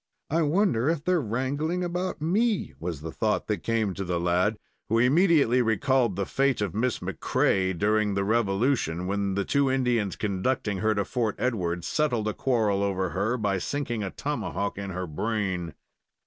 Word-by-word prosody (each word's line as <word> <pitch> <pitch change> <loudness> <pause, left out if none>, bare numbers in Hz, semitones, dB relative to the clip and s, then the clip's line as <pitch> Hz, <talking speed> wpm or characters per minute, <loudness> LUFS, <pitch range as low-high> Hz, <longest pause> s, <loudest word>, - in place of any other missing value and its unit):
"I 165 +2 +2
wonder 155 - +2
if 165 -3 -1
they're 180 -1 +2
wrangling 140 +9 -1
about 180 -2 -3
me?" 210 +6 +1
was 85 -4 -4
the 80 +1 -5
thought 110 +4 0
that 105 - -2
came 110 -4 0
to 95 - -4
the 90 -2 -1
lad, 90 +5 +1 0.3
who 115 - +2
immediately 140 -1 +4
recalled 115 0 +2
the 100 +1 -1
fate 135 +3 +1
of 100 -5 -1
Miss 120 +3 -1
MacCrea 95 -2 0
during 105 +1 +1
the 100 - +1
Revolution, 100 - +1
when 100 0 -1
the 100 - 0
two 140 -1 +2
Indians 125 -6 +1
conducting 105 0 -1
her 110 +1 +1
to 100 -1 0
Fort 115 -5 -1
Edward 90 -9 -1
settled 125 -8 0
a 110 - 0
quarrel 110 -6 +1
over 95 -3 -1
her 110 +6 0
by 100 -4 0
sinking 120 0 -3
a 100 - -2
tomahawk 100 -7 -3
in 100 -1 -5
her 90 0 -3
brain. 90 -1 -2
110 Hz, 175 wpm, -27 LUFS, 95-135 Hz, 0.3 s, immediately